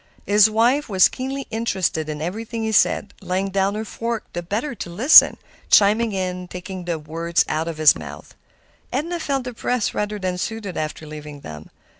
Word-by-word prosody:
His 210 +1 +5
wife 240 +7 +2
was 190 -3 +5
keenly 270 +1 -5
interested 190 -8 -1
in 150 0 -4
everything 225 +6 -4
he 220 - -1
said, 205 -1 +2
laying 190 +1 -2
down 195 +1 0
her 220 +1 -4
fork 230 +1 -4
the 175 - -3
better 215 - -3
to 195 - -7
listen, 235 - +7 0.3
chiming 215 +3 +4
in, 180 -2 -3
taking 180 +1 -7
the 170 -2 -2
words 165 +2 -1
out 160 +1 -2
of 165 -2 -5
his 155 -1 +6
mouth. - - -10 0.6
Edna 330 +7 -2
felt 275 -4 -2
depressed 250 -1 -2
rather 210 0 -2
than 185 -2 -3
soothed 215 -3 -4
after 155 0 -4
leaving 150 -1 -9
them. 75 - -10
195 Hz, 175 wpm, -21 LUFS, 170-230 Hz, 0.6 s, listen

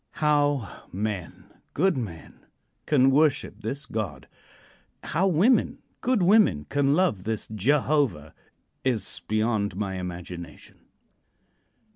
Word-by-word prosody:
How 145 - 0
men 100 -3 -4 0.3
good 185 +3 +2
men 100 -11 -7 0.4
can 135 -3 +4
worship 140 -6 +1
this 135 +7 -4
God; 100 - -5 0.8
how 170 +5 +1
women 195 +9 +3 0.2
good 250 -7 +1
women 190 - +4
can 140 - +1
love 160 - +1
this 110 0 -2
Jehovah, 125 - +1 0.5
is 125 -5 -2
beyond 110 -2 0
my 95 -2 -3
imagination. 90 -2 -8
120 Hz, 100 wpm, -26 LUFS, 95-150 Hz, 0.8 s, can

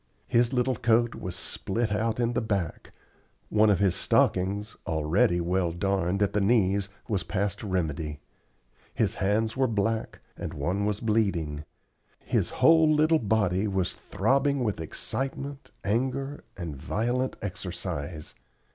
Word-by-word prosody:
His 120 0 +3
little 125 -1 +1
coat 120 +1 +3
was 90 -1 -5
split 110 +2 -2
out 110 +2 0
in 120 0 +1
the - - 0
back; 100 -7 -3 0.6
one 110 0 +4
of 100 - +4
his 100 -3 +3
stockings, 100 +4 +1
already 80 +3 +2
well 90 0 0
darned 95 +2 0
at 100 - 0
the 105 - +2
knees, 100 -2 +2 0.2
was 105 -6 0
past 100 -1 -2
remedy; 80 -7 -2 0.8
his - - +1
hands 110 +3 +1
were 130 0 +2
black, 110 0 -1 0.2
and - - -6
one 100 +3 -1
was 105 -1 -1
bleeding; 90 -10 0 0.5
his - - 0
whole 160 -1 +5
little 155 +1 +4
body 100 -2 +1
was 95 -3 0
throbbing 135 +7 +1
with 105 -7 -1
excitement, 135 - -4
anger, 130 +6 -1
and 85 -5 -5
violent 120 - -1
exercise. 75 +2 -5
105 Hz, 135 wpm, -27 LUFS, 90-120 Hz, 0.8 s, whole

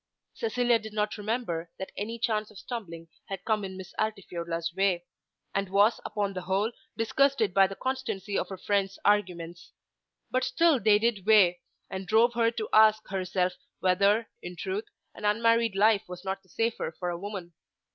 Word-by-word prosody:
Cecilia 245 - +1
did 220 0 -9
not 210 0 0
remember 205 -7 -2
that 190 - -6
any 225 +3 -4
chance 215 -2 -1
of 215 - -15
stumbling 170 -9 -7 0.2
had 195 -2 -6
come 215 -2 +1
in 190 -1 -6
Miss 190 -1 -9
Altifiorla's 170 -6 -3
way; 185 -2 +1 0.5
and 195 -1 -1
was 200 +4 +4
upon 205 -2 -2
the 185 - -4
whole 195 +5 0 0.3
disgusted 230 -2 +2
by 195 -1 +6
the 195 - -7
constancy 210 -4 -3
of - - -1
her 190 - -6
friend's 195 0 0
arguments. 175 -4 0 0.6
But 255 0 +1
still 325 +2 +3
they 215 -1 +5
did 215 -3 0
weigh, 190 -5 +6 0.3
and 190 0 -6
drove 230 +4 +4
her 230 -1 +3
to 230 -2 -4
ask 215 0 +6
herself 185 -1 0 0.3
whether, 200 +4 +3
in 180 0 -7
truth, 190 +4 -3 0.3
an - - -12
unmarried 230 +1 +3
life 215 +1 +4
was 180 +1 -8
not 190 0 -3
the 190 - -29
safer 225 +2 -1
for 180 -1 -2
a 170 - -5
woman. 190 -3 -6
205 Hz, 175 wpm, -28 LUFS, 185-225 Hz, 0.6 s, by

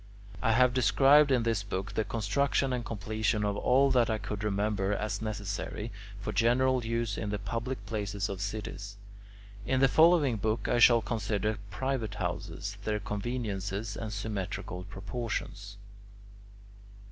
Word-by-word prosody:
I 115 - +3
have 125 +1 +4
described 135 +4 +5
in 125 -3 +3
this 115 -3 +1
book 100 0 -4
the 110 - +1
construction 130 +5 0
and 125 -1 -2
completion 110 0 -1
of 100 0 0
all 135 +6 +3
that 120 -3 +3
I 110 - +1
could 105 0 -5
remember 100 -1 0
as 105 0 -2
necessary 105 +1 -4 0.3
for 100 - -4
general 125 +2 +3
use 115 -2 -1
in 105 - -3
the 105 - -1
public 115 +2 -4
places 100 -1 -2
of 95 -1 -5
cities. 100 -1 -5 0.7
In 130 +4 +1
the 135 - +6
following 155 -4 +5
book 110 +3 -1
I 120 - +2
shall 120 -1 +7
consider 110 -1 -1
private 130 -1 -2
houses, 105 +1 -4
their 105 0 -1
conveniences, 105 -1 -3
and 110 -1 -5
symmetrical 100 -3 -4
proportions. 100 -1 -5
110 Hz, 145 wpm, -30 LUFS, 100-120 Hz, 0.7 s, shall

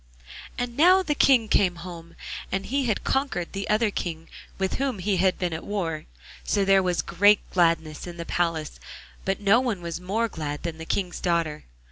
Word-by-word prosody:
And 245 -1 -3
now 365 +5 +6
the 305 -4 0
King 260 -5 +4
came 185 -4 +3
home, 170 -1 -10 0.4
and 195 0 -1
he 275 +1 0
had 215 - 0
conquered 265 -11 -1
the 195 0 -4
other 215 0 +2
King 165 -4 -5 0.3
with 190 0 -1
whom 270 -5 -1
he 195 +1 0
had 185 +1 +2
been 180 -2 -2
at 160 - -5
war. 170 -7 -3 0.4
So 200 -1 +1
there 195 0 +5
was 180 -2 0
great 205 +4 +4
gladness 165 -3 +1
in 175 -1 -8
the 170 - -5
palace, 165 -3 -1 0.5
but 195 0 0
no 205 +3 +5
one 240 -7 -1
was 170 0 -5
more 215 +6 0
glad 150 -7 -5
than 165 -2 -4
the 160 - -6
King's 180 0 -2
daughter. 165 -3 -1
185 Hz, 190 wpm, -25 LUFS, 170-210 Hz, 0.5 s, now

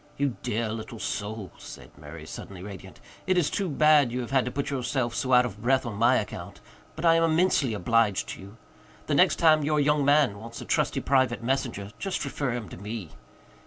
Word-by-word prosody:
"You 140 -4 0
dear 115 +1 -2
little 115 +2 -6
soul," 105 -3 -4
said - - -12
Murray, 75 +1 -10
suddenly 90 +3 -9
radiant. 95 -2 -10 0.3
"It 185 -1 +2
is 165 -4 +2
too 195 -3 -1
bad 150 -3 +4
you 125 +1 -2
have 120 - -7
had 135 -2 +2
to 125 - -3
put 140 +2 -3
yourself 130 -2 -1
so 130 - -2
out 125 0 +6
of 105 -3 -7
breath 130 +3 +2
on 115 - -4
my 120 +5 +3
account. 105 - -4 0.4
But 160 - -4
I 165 - +6
am 165 0 +3
immensely 160 -7 +2
obliged 105 +1 +1
to - - -7
you. 100 +3 -13 0.5
The - - -1
next - - +4
time 155 -2 +4
your 150 +1 +1
young 150 0 +2
man 140 -7 +3
wants 115 +2 -9
a - - -8
trusty - - 0
private 130 -4 +1
messenger 115 -6 -2
just 195 -6 -3
refer 140 -1 -2
him 120 -4 -5
to - - -10
me." 105 -2 -6
125 Hz, 210 wpm, -27 LUFS, 105-145 Hz, 0.5 s, out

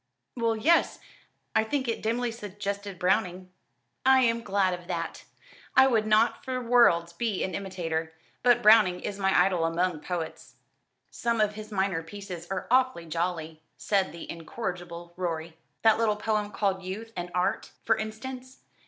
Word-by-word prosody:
"Well, 230 -2 +1
yes, 325 +11 +3 0.6
I 220 - +4
think 260 +3 -2
it 230 - -2
dimly 235 +2 0
suggested 200 -2 -5
Browning." 185 0 0 0.5
"I 265 0 +6
am 230 -2 +2
glad 195 -3 +1
of 175 -1 -7
that. 180 - -4 0.5
I 265 - +8
would 225 -5 +2
not 215 0 +3
for 260 -1 -2
worlds 230 -9 +4
be 215 +1 -1
an 190 - -3
imitator; 165 -4 -3 0.3
but 240 -1 +4
Browning 210 -5 +6
is 200 0 -5
my 195 0 +3
idol 180 -4 0
among 165 0 0
poets." 165 0 -5 0.6
"Some 235 -1 -1
of 210 -1 +2
his 215 0 -9
minor 190 -4 0
pieces 180 0 -8
are 195 - -3
awfully 255 -9 +3
jolly," 165 -1 -3 0.2
said 195 -4 +1
the 170 +1 -9
incorrigible 175 -1 -6
Rorie. 165 -2 -3 0.3
"That 220 -1 +5
little 220 -2 +2
poem 210 -1 -1
called 195 -2 -1
'Youth 210 +5 -7
and 175 0 -4
Art,' 180 - 0 0.2
for - - +4
instance. 255 +4 -7
200 Hz, 155 wpm, -28 LUFS, 175-225 Hz, 0.6 s, I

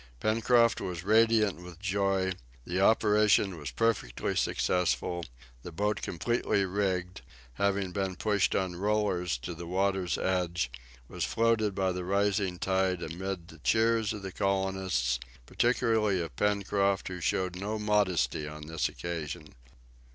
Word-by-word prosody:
Pencroft 115 - +3
was 90 -3 -4
radiant 110 -2 +3
with 90 -2 -11
joy, 95 -1 0 0.3
the 90 +2 -1
operation 105 -2 +4
was 75 -5 -6
perfectly 60 - -1
successful; 90 -1 0 0.4
the 85 - -8
boat 105 +4 -1
completely 100 +2 0
rigged, 95 -1 -2 0.4
having 100 -2 +1
been 95 0 -2
pushed 105 0 +1
on 95 -2 -1
rollers 95 -6 0
to 85 +9 -6
the 85 +1 -8
water's 95 0 0
edge, 90 -7 -1 0.4
was - - -4
floated 115 -3 +1
by 95 -1 +1
the 90 0 -4
rising 100 -1 +1
tide, 95 -1 0
amid 90 +1 -5
the - - -14
cheers 115 -1 +2
of 105 -2 -6
the 95 - -5
colonists, 95 -11 0 0.3
particularly 110 - +1
of 80 -6 -5
Pencroft, 100 0 +1
who 90 -1 -6
showed 90 +1 0
no 100 +4 -3
modesty 95 - +1
on 75 0 -8
this 80 0 -1
occasion. 80 -3 -6
95 Hz, 135 wpm, -29 LUFS, 90-105 Hz, 0.4 s, operation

